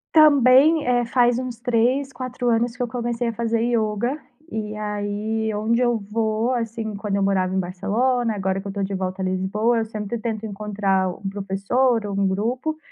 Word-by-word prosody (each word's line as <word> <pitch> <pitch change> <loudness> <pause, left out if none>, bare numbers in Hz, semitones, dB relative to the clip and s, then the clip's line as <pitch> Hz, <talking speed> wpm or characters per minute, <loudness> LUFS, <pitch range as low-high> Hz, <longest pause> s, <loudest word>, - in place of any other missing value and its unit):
Também, 290 0 +6
eh, 245 -1 +3
faz 240 0 +3
uns 250 -2 -5
3, 250 +3 +1
4 250 -1 -3
anos 235 +1 +1
que 250 - -6
eu 245 - 0
comecei 240 0 -2
a 230 - -1
fazer 230 0 0
yoga. 235 +2 0 0.3
E 215 -1 -4
aí, 210 +1 -2
onde 225 +4 +1
eu 240 -1 +2
vou, 220 +2 0
assim, 225 -2 -3
quando 200 0 -2
eu - - 0
morava 190 -2 +1
em 190 - +1
Barcelona, 220 +7 0
agora 190 -1 -1
que - - -19
eu - - -4
estou 200 0 -4
de 195 +1 -3
volta 185 0 -3
a - - -1
Lisboa, 200 +5 +1
eu 225 - -1
sempre 215 +1 -4
tento 225 -1 -4
encontrar 200 -2 0
um 190 +2 -6
professor 205 +4 0
ou 200 - -4
um 200 - +2
grupo. 245 +11 -2
220 Hz, 190 wpm, -23 LUFS, 200-245 Hz, 0.3 s, Também